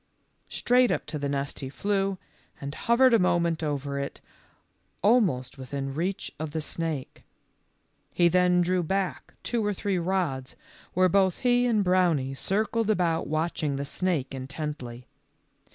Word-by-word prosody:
Straight 250 0 +3
up - - -1
to 150 - -4
the 140 0 -2
nest 140 0 -2
he 135 - -5
flew, 195 +4 -1 0.4
and 140 0 -5
hovered 240 +7 +4
a 230 - +6
moment 170 -2 +2
over 140 -2 -2
it 140 - -5 0.8
almost 180 - +2
within 135 +1 -4
reach 185 +6 -2
of 155 -1 -4
the 160 - -1
snake. 155 -3 -4 0.9
He 175 - +4
then 180 0 +4
drew 180 +1 +1
back 190 +3 -2
two 235 -2 -1
or 205 -1 0
three 195 -1 -1
rods, 170 -8 -1 0.4
where 185 +1 +5
both 190 0 +2
he 245 0 +3
and 215 -4 +2
Brownie 175 -8 +2
circled 215 +8 0
about 175 -6 +1
watching 155 -2 -1
the 140 +1 -3
snake 155 -4 -1
intently. 135 -3 -6
170 Hz, 145 wpm, -27 LUFS, 140-195 Hz, 0.9 s, a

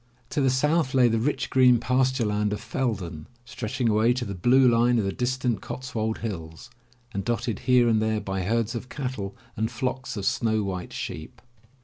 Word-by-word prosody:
To 145 - 0
the 135 - +3
south 150 +2 +1
lay 125 -2 +6
the 115 0 +1
rich 130 +2 -1
green 125 -2 +5
pasture 130 0 +1
land 105 0 0
of 105 - -3
Feldon, 105 - -3 0.2
stretching 120 +1 -3
away 110 +2 +3
to 125 0 -3
the 100 - -4
blue 125 +8 +4
line 120 +1 +4
of 110 - +1
the 95 - 0
distant 125 -2 -1
Cotswold 115 -4 -3
hills, 80 +2 -7 0.4
and 100 - -2
dotted 115 -1 -2
here 125 -1 +6
and 110 -2 +3
there 110 0 +1
by 95 -2 -3
herds 115 +4 0
of 120 +1 -6
cattle 125 -8 -4 0.2
and 110 +1 -1
flocks 130 0 -3
of 100 - -3
snow 110 0 +1
white 95 -2 -4
sheep. 80 - -6
115 Hz, 190 wpm, -26 LUFS, 105-125 Hz, 0.4 s, lay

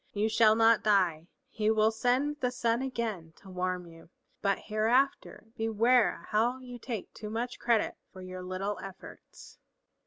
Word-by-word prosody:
You 215 +2 0
shall 220 -1 +5
not 225 0 +5
die, 180 -6 +2 0.2
he 215 -1 -1
will 220 0 +3
send 255 +6 0
the 250 - +1
sun 235 -1 0
again 225 -11 -4
to 195 - -15
warm 180 0 -2
you. 165 -1 -15 0.3
But 200 -1 +1
hereafter 225 +3 0
beware 225 +2 +2
how 235 +4 +2
you 250 -2 -10
take 230 -4 -6
too 210 - -7
much 235 +3 -4
credit 235 -3 +1
for 185 -1 -11
your 185 0 -7
little 185 +3 -4
efforts." 195 -1 -12
220 Hz, 155 wpm, -30 LUFS, 195-240 Hz, 0.3 s, shall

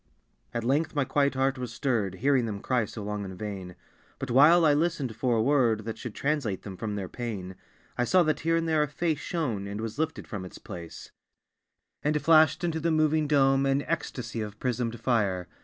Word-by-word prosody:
At 115 - -3
length 150 +6 0
my 145 -2 +2
quiet 140 +1 +1
heart 135 0 +1
was 125 -2 -4
stirred, 110 -6 -1
Hearing 130 +2 +2
them 100 -2 -4
cry 125 +1 0
so 105 +1 -8
long 105 0 -3
in 95 -2 -7
vain. 95 -3 -6 0.4
But 135 -2 -5
while 160 +7 +7
I 150 - +5
listened 145 -6 0
for 120 +1 +1
a 110 - +2
word 120 -5 +3
That 110 -1 -5
should 115 -3 -7
translate 135 -10 -1
them 95 -2 -7
from 105 +2 -4
their 100 -2 -4
pain, 100 -5 -5 0.5
I 125 - +3
saw 180 +6 +4
that 155 -1 0
here 165 +1 +1
and 165 0 0
there 160 -1 +2
a 150 - +1
face 155 +1 -1
Shone, 125 - -2
and 100 +1 -5
was 115 +4 -5
lifted 160 0 -2
from 105 -6 -5
its 90 - -9
place, 85 -2 -9 0.9
And 150 +1 +1
flashed 155 +1 +5
into 165 -2 0
the 165 +2 0
moving 155 -1 +2
dome 135 -1 +3
An 135 +1 +1
ecstasy 135 -8 -3
of 105 -1 -6
prismed 120 -2 -2
fire. 100 -7 0
130 Hz, 205 wpm, -28 LUFS, 110-150 Hz, 0.9 s, while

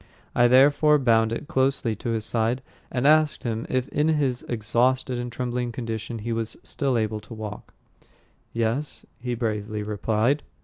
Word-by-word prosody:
I 120 - +5
therefore 145 +4 +5
bound 115 -4 +3
it 115 +5 -4
closely 130 -5 +1
to 120 - -4
his 110 -2 -1
side, 120 +3 0 0.3
and 125 +1 -1
asked 155 0 +4
him 115 -2 -2
if 130 0 0
in 150 +1 +1
his 140 -6 +1
exhausted 125 +3 +1
and 120 0 -4
trembling 120 0 -2
condition 115 -1 -4
he 120 - -1
was 115 -1 -3
still 135 -3 -1
able 110 -1 -1
to 110 +2 -11
walk. 105 -1 -8 0.8
"Yes," 115 +6 -2
he 125 0 -3
bravely 105 -2 -2
replied. 110 +6 +1
120 Hz, 160 wpm, -25 LUFS, 110-130 Hz, 0.8 s, I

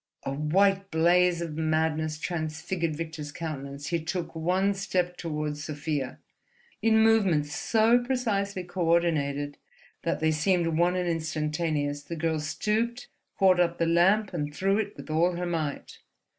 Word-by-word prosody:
A - - -3
white 195 +7 +2
blaze 175 +1 +3
of 160 -3 -5
madness 155 -1 0
transfigured 160 0 -3
Victor's 160 -2 -6
countenance. 140 -3 -6
He 170 -2 -1
took 175 +1 -3
one 185 +5 +1
step 185 -2 -1
toward 150 -3 -3
Sofia. 150 -2 -3 0.6
In 220 0 +4
movements 185 -10 +3
so 225 +2 +3
precisely 205 -7 -1
coordinated 165 -5 0 0.4
that - - -1
they 160 0 +2
seemed 170 +3 +2
one 175 +2 +2
and 180 -1 -1
instantaneous, 155 -2 -1
the 170 +4 -6
girl 160 -1 -1
stooped, 220 +10 -2 0.3
caught 185 -2 +5
up 170 -1 +2
the 165 - +1
lamp, 190 +5 +3
and 150 -3 -2
threw 195 +7 +1
it 205 -1 -3
with - - -8
all 170 +3 +2
her 175 +1 -3
might. 160 -4 -3
170 Hz, 145 wpm, -27 LUFS, 155-185 Hz, 0.6 s, caught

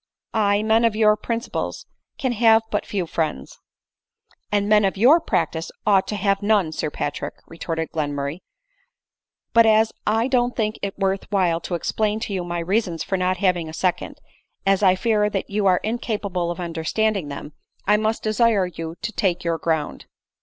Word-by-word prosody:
Aye, 205 -1 +2
men 220 +1 +3
of 230 -2 +2
your 215 -1 +4
principles 235 - -4 0.3
can 260 -2 -1
have 225 -1 +4
but 205 - -1
few 195 -4 -2
friends." 155 - -3 0.5
" - - -38
And 205 -1 +1
men 210 0 +5
of 195 0 0
your 265 - +6
practice 165 - -1
ought 195 -2 +3
to 210 - -3
have 200 0 +1
none, 205 -6 +2
Sir 155 - -2
Patrick," 145 0 -4
retorted 165 0 -4
Glenmurray; 145 0 -3 0.6
" - - -64
but 230 -1 +6
as 220 0 +4
I 225 +3 +2
don't 245 -2 +1
think 215 -2 -1
it 200 -1 -4
worth 195 0 -1
while 175 -4 +1
to 175 - -3
explain 215 +5 -1
to 205 - -4
you 185 -2 -2
my 175 0 -4
reasons 180 -2 -1
for 190 - -2
not 185 0 0
having 180 -4 +1
a - - -9
second, 180 +2 -2 0.5
as 195 0 +3
I 185 -2 +5
fear 210 +1 +1
that 200 -1 -4
you 205 -1 +1
are 180 -1 +5
incapable 205 -6 -2
of 175 - -4
under 165 -2 -4
standing 215 -2 0
them, 145 +1 -7 0.3
I 210 +1 +4
must 220 +1 -1
desire 215 -2 +2
you 165 -2 -6
to 230 - -2
take 180 -4 0
your 165 -1 -1
ground." 160 -3 -2
200 Hz, 185 wpm, -22 LUFS, 175-215 Hz, 0.6 s, your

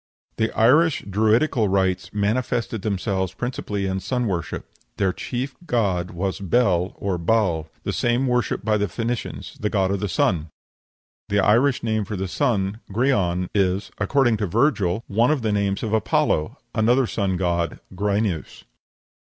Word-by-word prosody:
The 110 0 +1
Irish 150 +8 +4
Druidical 110 +4 +2
rites 95 -1 0
manifested 115 +1 -1
themselves 95 -2 -1
principally 105 -4 -3
in 95 0 -1
sun 125 +6 -1
worship. 90 -7 -3 0.3
Their 95 -2 +1
chief 130 +6 -4
god 95 -7 0
was 95 +2 -3
Bel 95 -3 +1
or 95 -3 -2
Baal 85 -4 +1
the - - -2
same 120 +2 +1
worshipped 125 -1 0
by 110 -1 +3
the 105 0 0
Phoenicians 115 +6 -4
the 105 - 0
god 95 -2 +1
of 100 - 0
the 105 0 -2
sun. 80 -2 +1 0.8
The 100 - +2
Irish 120 +7 +3
name 110 -2 0
for 105 +1 -5
the 95 0 -2
sun, 100 +1 0
Grian, 95 -7 +1
is, 95 -1 +1
according 120 +2 +2
to 105 -1 -1
Virgil, 105 - +1
one 115 +5 +2
of 150 -5 +1
the 110 - +1
names 100 -1 0
of 110 -1 -2
Apollo 90 -7 +1 0.2
another 120 +4 +3
sun 100 -5 -1
god, 85 -3 -1
Gryneus. 100 -3 -1
105 Hz, 150 wpm, -23 LUFS, 95-115 Hz, 0.8 s, Irish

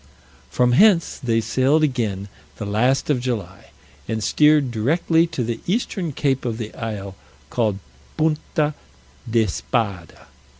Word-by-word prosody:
From 125 0 +2
hence 180 - +4
they 115 -3 +1
sailed 130 +7 +2
again 110 -9 -1 0.3
the 105 - -6
last 125 +8 +1
of 135 - +1
July, 105 -7 -5 0.4
and 110 -1 -2
steered 150 -2 +4
directly 160 +8 +2
to 135 -6 -3
the 115 0 -3
eastern 190 -4 -1
cape 135 -1 0
of 115 -3 -2
the 110 -2 -6
isle 105 -4 -5 0.4
called 110 -5 0 0.4
Punta 155 -1 0 0.6
d'Espada. 110 -4 -1
125 Hz, 125 wpm, -22 LUFS, 110-150 Hz, 0.6 s, hence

